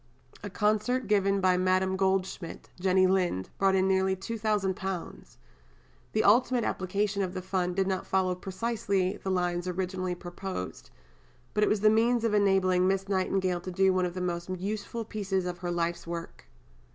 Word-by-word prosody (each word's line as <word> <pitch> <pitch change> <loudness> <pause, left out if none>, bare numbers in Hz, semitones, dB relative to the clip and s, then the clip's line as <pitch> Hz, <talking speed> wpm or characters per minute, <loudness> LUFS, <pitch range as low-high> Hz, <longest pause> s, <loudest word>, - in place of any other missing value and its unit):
A 205 - -6
concert 215 +6 +1
given 200 -1 +2
by 185 -1 +3
Madame 185 +1 +2
Goldschmidt 190 -2 -2
(Jenny 185 0 +3
Lind) 180 - 0
brought 195 0 +3
in 190 0 +3
nearly 190 0 +2
£2000. 195 -3 -3 0.8
The 215 - +2
ultimate 245 +3 +4
application 200 +2 -1
of 185 -1 -3
the 185 - -3
Fund 180 -1 -1
did 195 0 +2
not 190 -1 -2
follow 185 -1 +1
precisely 195 0 -1
the 190 - -5
lines 180 -1 0
originally 185 0 -2
proposed, 175 - -6 0.6
but 210 - +2
it - - +3
was 210 -2 +1
the 215 0 +6
means 230 +2 +3
of 225 -2 +1
enabling 190 -3 +3
Miss 195 0 0
Nightingale 185 -2 0
to 185 - -6
do 190 +1 +3
one 185 -1 +1
of 175 - -8
the 185 - -3
most 175 0 -3
useful 205 +5 -4
pieces 195 -4 -2
of 180 -1 -4
her 175 - -4
life's 170 -1 -2
work. 170 - -7
190 Hz, 165 wpm, -29 LUFS, 180-200 Hz, 0.8 s, the